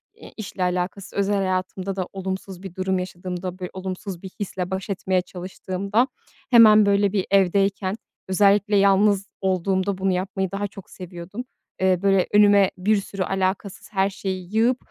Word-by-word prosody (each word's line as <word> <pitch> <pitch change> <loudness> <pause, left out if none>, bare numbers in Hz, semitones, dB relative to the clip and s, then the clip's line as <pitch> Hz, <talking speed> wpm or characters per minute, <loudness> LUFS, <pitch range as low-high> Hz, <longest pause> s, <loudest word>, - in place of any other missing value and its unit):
eee, - - -13
işle 195 -3 -4
alakasız 180 +2 -2
özel 200 +1 +1
hayatımda 185 0 -2
da 185 -2 -3
olumsuz 190 -1 -5
bir 190 -2 -8
durum 190 0 0
yaşadığımda, 180 0 -5
böyle, 180 -1 -5
olumsuz 185 -1 -6
bir 190 - -6
hisle 185 -2 -4
baş 190 +2 -4
etmeye 185 -1 0
çalıştığımda 185 +5 -2 0.4
hemen, 215 -3 +8
böyle, 200 -1 +3
bir, 195 -3 0
evdeyken, 195 0 +2 0.3
özellikle 200 +2 +3
yalnız 200 0 +4
olduğumda 190 +1 0
bunu 190 0 +1
yapmayı 190 0 -2
daha 200 +1 -2
çok 195 -1 -13
seviyordum. 180 +5 -8 0.4
Eee, 185 -2 +3
böyle, 195 -2 +3
önüme 205 -2 +6
bir 205 +3 +2
sürü 195 -1 -3
alakasız 190 +1 -2
her 195 0 +2
şeyi 190 0 -5
yığıp, 240 +3 +3
190 Hz, 155 wpm, -23 LUFS, 185-200 Hz, 0.4 s, hemen